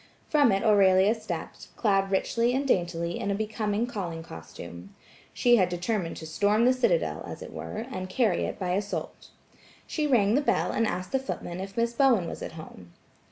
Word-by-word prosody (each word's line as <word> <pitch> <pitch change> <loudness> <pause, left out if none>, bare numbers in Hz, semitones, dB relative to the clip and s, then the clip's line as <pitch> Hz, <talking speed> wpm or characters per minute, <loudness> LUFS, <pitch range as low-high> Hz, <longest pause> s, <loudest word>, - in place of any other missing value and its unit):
From 290 -6 +4
it 195 0 +1
Aurelia 200 -1 +5
stepped, 200 -8 -6
clad 195 -3 +2
richly 230 +5 +1
and 275 +1 0
daintily 170 -5 0
in - - -2
a 200 - +1
becoming 215 +1 -1
calling 180 -9 -5
costume. 85 - -10 0.4
She 240 -1 +4
had 185 -4 +3
determined 180 0 -2
to 160 - -8
storm 205 +8 +2
the 255 - +5
citadel, 485 - +1
as - - -7
it - - -10
were, 220 +2 -5
and 185 -5 -5
carry 210 -3 +1
it - - -5
by 180 -2 -2
assault. 200 +2 -3 0.6
She 305 -2 -1
rang 220 -7 +3
the 280 - +3
bell 285 - +1
and 230 - +1
asked 180 -1 -4
the 265 - +2
footman 185 -9 -5
if 195 +2 -7
Miss 235 0 +1
Bowen 240 -9 +3
was - - -7
at - - -6
home. 90 - -11
200 Hz, 190 wpm, -27 LUFS, 180-235 Hz, 0.6 s, Aurelia